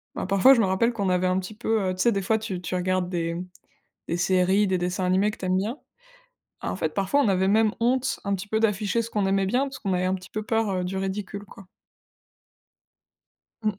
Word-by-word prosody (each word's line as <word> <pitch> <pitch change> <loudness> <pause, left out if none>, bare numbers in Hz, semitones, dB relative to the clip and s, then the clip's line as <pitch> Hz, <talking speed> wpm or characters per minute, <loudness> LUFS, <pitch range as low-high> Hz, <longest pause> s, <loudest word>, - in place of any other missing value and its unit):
bah, - - -3
parfois 195 +7 +6
je 255 - +2
me - - +3
rappelle 190 +6 +1
qu'on 200 -4 -1
avait 180 0 +2
un 185 0 +1
petit 190 +3 -7
peu, 220 0 0
heu, - - -1
tu 185 - -3
sais? 235 - +4
Des 200 - -1
fois 220 +4 +1
tu 205 -5 -5
tu 180 - -4
regardes 180 0 0
des 170 -2 -2 0.7
des 170 - 0
séries, 185 +3 +2
des 190 -1 +1
dessins 180 +2 -2
animés 190 +3 +2
que - - -9
tu - - -7
aimes 185 0 +2
bien. 220 +8 -3 0.8
En - - -2
fait, 160 -4 -2
parfois 195 +8 +1
on 275 - +2
avait 190 -1 +2
même 215 +1 +3
honte 250 +2 +1
un 200 -1 0
petit 195 +2 -6
peu 220 +1 0
d'afficher 210 +1 +1
ce 230 - -7
qu'on 205 -3 0
aimait 195 0 +2
bien, 245 +7 +1
parce 275 -1 -7
qu'on 195 - -2
avait 180 0 0
un 185 - +1
petit 185 0 -8
peu 215 - -3
peur, 225 -1 0
heu, 185 -1 -1
du 185 +2 -4
ridicule 195 +1 -4
quoi. 195 -2 -15 2.0
Mmh. 215 -2 0
195 Hz, 240 wpm, -25 LUFS, 185-215 Hz, 2.0 s, parfois